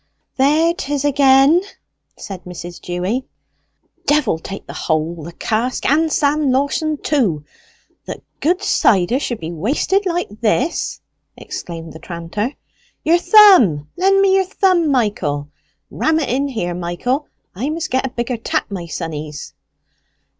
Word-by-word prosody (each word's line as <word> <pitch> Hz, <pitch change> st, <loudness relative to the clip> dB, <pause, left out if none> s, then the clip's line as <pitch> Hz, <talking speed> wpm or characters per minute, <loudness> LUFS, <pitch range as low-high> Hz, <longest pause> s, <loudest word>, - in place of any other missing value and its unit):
"There 305 Hz, +5 st, +3 dB
'tis 290 Hz, -3 st, -3 dB
again!" 280 Hz, +3 st, +5 dB, 0.6 s
said 190 Hz, -3 st, -8 dB
Mrs. 175 Hz, -1 st, -8 dB
Dewy. 185 Hz, +9 st, -3 dB, 0.8 s
"Devil 290 Hz, -, +2 dB
take 195 Hz, +4 st, -8 dB
the -, -, -9 dB
hole, 160 Hz, +1 st, -2 dB
the 170 Hz, -, -7 dB
cask, 225 Hz, +8 st, -2 dB
and 315 Hz, +3 st, +2 dB
Sam 295 Hz, -1 st, +2 dB
Lawson 285 Hz, +3 st, 0 dB
too, 205 Hz, -, 0 dB, 0.6 s
that -, -, -7 dB, 0.2 s
good 360 Hz, +6 st, +1 dB
cider 200 Hz, -, +3 dB
should 240 Hz, -5 st, -3 dB
be 160 Hz, 0 st, -5 dB
wasted 285 Hz, -, 0 dB
like 340 Hz, -, -3 dB
this!" 235 Hz, +9 st, 0 dB, 0.4 s
exclaimed 165 Hz, -2 st, -7 dB
the 160 Hz, -, -10 dB
tranter. 175 Hz, -, -4 dB, 0.5 s
"Your 335 Hz, +3 st, +4 dB
thumb! 345 Hz, -, +6 dB
Lend 390 Hz, +2 st, +3 dB
me 390 Hz, -1 st, +4 dB
your 380 Hz, -, +2 dB
thumb, 365 Hz, -4 st, +2 dB
Michael! 200 Hz, -, 0 dB, 0.4 s
Ram 315 Hz, 0 st, +1 dB
it 295 Hz, -, -2 dB
in 275 Hz, +3 st, 0 dB
here, 200 Hz, -10 st, -3 dB
Michael! 180 Hz, -, -2 dB, 0.3 s
I 245 Hz, +10 st, -3 dB
must 320 Hz, +1 st, -3 dB
get 260 Hz, +1 st, +1 dB
a 265 Hz, -, -2 dB
bigger 240 Hz, 0 st, -3 dB
tap, 225 Hz, -, -2 dB
my 180 Hz, -4 st, -5 dB
sonnies." 155 Hz, -2 st, -6 dB
255 Hz, 140 wpm, -18 LUFS, -, 0.8 s, thumb